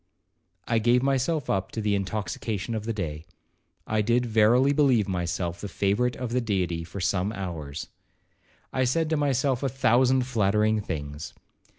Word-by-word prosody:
I 115 - +2
gave 120 +3 +3
myself 135 +2 0
up 95 0 -1
to - - -3
the 105 -1 0
intoxication 100 +2 -3
of 110 -1 -3
the 115 - -1
day,—I 90 +4 -6
did 120 +3 +2
verily 120 +5 +4
believe 130 -8 +3
myself 85 -1 -2
the 105 - -4
favourite 105 +6 0
of 125 -2 -5
the 125 +1 +1
Deity 90 -7 -1
for 85 +4 -8
some 95 +2 0
hours. 80 -7 -5 0.9
I 130 - +1
said 155 +6 +1
to - - +3
myself 135 -3 +1
a 135 - 0
thousand 130 0 +3
flattering 110 -2 +2
things. 75 -5 -6
110 Hz, 155 wpm, -26 LUFS, 95-125 Hz, 0.9 s, verily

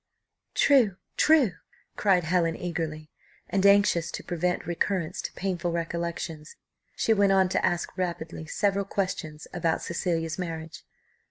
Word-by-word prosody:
"True, 235 -10 +4 0.2
true," 300 -9 +5 0.4
cried 190 -4 +3
Helen 165 0 +1
eagerly; 160 -3 -4 0.4
and 195 -1 0
anxious 200 -4 +4
to - - -5
prevent 180 +1 -1
recurrence 175 0 -1
to - - -5
painful 180 -2 -2
recollections, 170 -2 -4 0.4
she 225 - +2
went 200 -2 +4
on 190 -1 +4
to - - 0
ask 175 -1 0
rapidly 165 -3 -3
several 200 +2 0
questions 165 -6 -3
about 165 -2 0
Cecilia's 165 -1 -2
marriage. 165 -2 -5
175 Hz, 125 wpm, -27 LUFS, 165-195 Hz, 0.4 s, true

